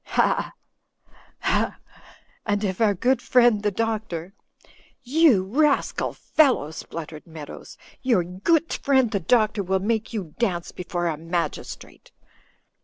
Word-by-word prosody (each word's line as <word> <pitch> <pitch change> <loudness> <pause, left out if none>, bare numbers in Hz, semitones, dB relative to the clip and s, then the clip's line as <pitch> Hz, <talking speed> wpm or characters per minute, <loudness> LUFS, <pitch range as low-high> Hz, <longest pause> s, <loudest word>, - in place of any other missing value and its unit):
Ha! - - +1 0.9
ha! - - 0 0.7
And 205 0 0
if 190 +1 -2
our 210 -3 +4
good 255 +8 +1
friend, 240 -4 +4
the 210 - +1
Doctor 205 -4 -3 0.2
— - - -27
" - - -34 0.2
"You 265 - +6
rascal 280 +9 +1
fellow!" 265 - +2
spluttered 160 -1 -8
Meadows, 155 -3 -10 0.2
"your 235 -9 +2
goot 245 - 0
friend 265 -5 +2
the 200 - 0
doctor 215 +3 +2
will 190 0 0
make 220 +3 -1
you 195 -9 -5
dance 180 -8 -1
before 175 -1 -4
a 165 -3 -1
magistrate." 165 +2 -5
205 Hz, 130 wpm, -24 LUFS, 175-240 Hz, 0.9 s, You